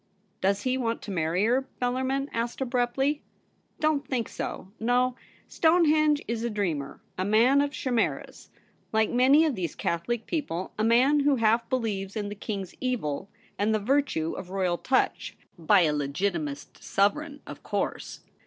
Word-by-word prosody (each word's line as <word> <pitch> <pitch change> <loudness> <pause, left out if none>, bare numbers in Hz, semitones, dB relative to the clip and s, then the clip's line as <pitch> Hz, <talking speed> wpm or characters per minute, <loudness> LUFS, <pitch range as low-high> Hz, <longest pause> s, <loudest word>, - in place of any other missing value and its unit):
' - - -42
Does 195 +1 +1
he 255 0 0
want 230 -2 -2
to 205 - -6
marry 175 +2 +1
her 250 +4 +3
?' - - -38
Bellarmin 260 +2 0
asked 235 +1 -2
abruptly. 265 +3 0 0.3
* - - -42
Don't 310 -2 +1
think 240 -4 -2
so; 190 - -6
no, 245 +2 +2 0.3
Stonehenge 310 -3 +3
is 230 0 -2
a 235 - 0
dreamer, 175 -10 -2 0.2
a - - +1
man 230 +8 +4
of 285 - +1
chimeras; 255 -5 -2 0.4
like 220 0 +2
many 270 +6 +5
of 305 - +1
these 180 -8 -4
Catholic 220 +8 -2
people, 190 - -3
a 215 - -1
man 250 +6 +4
who 285 0 +3
half 230 0 +2
believes 210 -6 -2
in 205 -2 -3
the - - -5
King's 200 -2 -5
Evil 200 - -2 0.3
and 215 +2 +2
the - - +1
virtue 235 - 0
of 180 - -7
royal 185 -2 0
touch 260 - 0
— - - -41
by 185 +4 +5
a 155 -3 +3
Legitimist 150 +1 -3
Sovereign, 285 +10 0
of - - -9
course. - - -3
230 Hz, 170 wpm, -27 LUFS, 195-265 Hz, 0.4 s, many